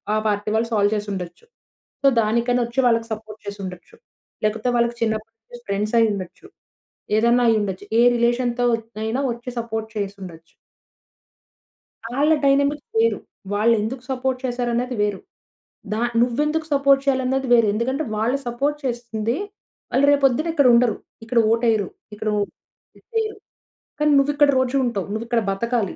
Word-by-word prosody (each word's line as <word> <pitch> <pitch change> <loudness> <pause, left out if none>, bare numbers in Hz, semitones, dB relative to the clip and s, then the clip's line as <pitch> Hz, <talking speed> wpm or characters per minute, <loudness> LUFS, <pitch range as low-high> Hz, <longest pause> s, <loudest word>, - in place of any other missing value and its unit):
ఆ - - +2
పార్టీ 210 0 -1
వాళ్ళు 225 +1 +1
సాల్వ్ 205 -1 +3
చేసి 210 0 -3
ఉండచ్చు. 180 - -7 0.6
సో 275 - +4
దానికనోచ్చి 235 +2 0
వాళ్ళకి 230 -1 +1
సపోర్ట్ 215 0 -9
చేసి 205 0 -6
ఉండచ్చు. 180 -1 -10 0.5
లేకపోతే 220 +3 0
వాళ్ళకి 235 0 +1
చిన్నప్పటి 220 0 -3 0.2
నుంచి 240 - -9
ఫ్రెండ్సయ్యుండొచ్చు. 210 -2 0 0.7
ఏదైనైండచ్చు. 225 -4 +2
ఏ - - +6
రిలేషన్‌తో 240 +1 +1 0.4
అయినా 225 +5 -1
వచ్చి 240 +2 -8
సపోర్ట్ 225 -1 -4
చేసుండచ్చు. 190 -5 -7 1.6
ఆళ్ళ 300 +3 +4
డైనమిక్ 280 +1 +2 0.2
వేరు. 460 - +3 0.4
వాళ్ళు 220 +3 +3
ఎందుకు 245 +4 -4
సపోర్ట్ 260 0 -1
చేసారన్నది 245 0 -1
వేరు. 205 -2 0 0.7
ద - - -1 0.3
నువ్వు 245 +1 +1
ఎందుకు 315 +1 -1
సపోర్ట్ 275 -1 +4
చేయాలన్నది 265 -1 +1
వేరు. 230 -2 +5
ఎందుకంటే 260 +7 -1
వాళ్ళు 230 +6 +1
సపోర్ట్ 280 +5 -1
చేస్తుంది, 235 -1 -2 0.6
వాళ్ళు 275 - +3
రేపు 285 -1 +2
పొద్దున 275 +5 +2
ఇక్కడ 285 -5 +4
ఉండరు. 235 -2 +4 0.3
ఇక్కడ 235 +1 +2
ఓట్ 230 +1 +1
వెయ్యరు. 215 -4 +2 0.3
ఇక్కడ 215 +1 -3
ఓహ్! 205 - -1 0.5
‌దిదెయ్యరు 440 -2 -3 0.6
కానీ 300 0 +3
నువ్వు 275 +1 +3
ఇక్కడ 290 -1 +4
రోజు 260 +1 0
ఉంటావు. 205 -6 -2
నువ్వు 220 +2 -3
ఇక్కడ 235 -1 +1
బతకాలి 230 +1 -1
235 Hz, 140 wpm, -22 LUFS, 215-260 Hz, 1.6 s, ఏ